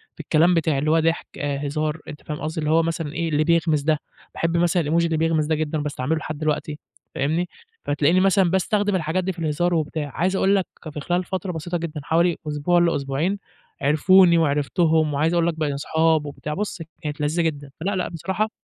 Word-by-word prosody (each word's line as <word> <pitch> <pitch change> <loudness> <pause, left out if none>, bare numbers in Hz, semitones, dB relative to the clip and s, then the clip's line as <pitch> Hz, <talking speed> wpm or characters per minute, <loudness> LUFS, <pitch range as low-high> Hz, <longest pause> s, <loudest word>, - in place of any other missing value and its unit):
في - - -31
الكلام 170 +3 +3
بتاعي، 160 -4 +1
اللي 155 +2 +1
هو 165 - +4
ضحك 165 +1 0
آآ، 145 0 -2
هزار 155 +2 -2
أنت 150 - -9
فاهم 150 -1 -5
قصدي، 155 +1 -3
اللي 150 0 0
هو 165 +1 +4
مثلًا 160 -2 -3
إيه 165 0 -1
اللي 150 0 +2
بيغمز 160 -2 +2
ده، 155 0 +1 0.3
باحب 165 +1 0
مثلًا 175 0 +2
الإيموجي 165 +3 +1
اللي 165 -1 0
بيغمز 160 -1 +1
ده 160 0 +1
جدًا 155 0 -2
وباستعمله 145 0 -2
لحد 155 -1 -5
دلوقتي، 150 0 -2 0.4
فاهمني. 160 +6 0 0.4
فتلاقيني 145 +5 +2
مثلًا 190 -2 +3
باستخدم 205 +2 +1
الحاجات 170 +2 0
دي 190 - -1
في 175 - -10
الهزار 165 +2 0
وبتاع، 155 -2 -2
عايز 185 +3 +1
اقول 195 +1 +3
لك 190 - 0 0.2
في 150 - -6
خلال 175 +5 0
فترة 185 0 -4
بسيطة 175 +1 -3
جدًا 165 -2 -5
حوالي 170 +3 +2
أسبوع 150 +4 +2
لأسبوعين، 165 +3 0 0.4
عرفوني 170 +5 +5
وعرفتهم 155 +1 +2
وعايز 155 +4 +1
اقول 170 -1 +2
لك 170 - +1
بقينا 145 -2 0
اصحاب 160 +2 +1
وبتاع، 150 +1 -5
بصُ 195 -1 -4 0.2
كانت 150 -1 -4
لذيذة 155 +4 +1
جدًا. 145 -3 -2
فلأ، 195 +3 -1
لأ، 185 - -1
بصراحة 190 +6 -2
160 Hz, 205 wpm, -23 LUFS, 150-175 Hz, 0.4 s, عرفوني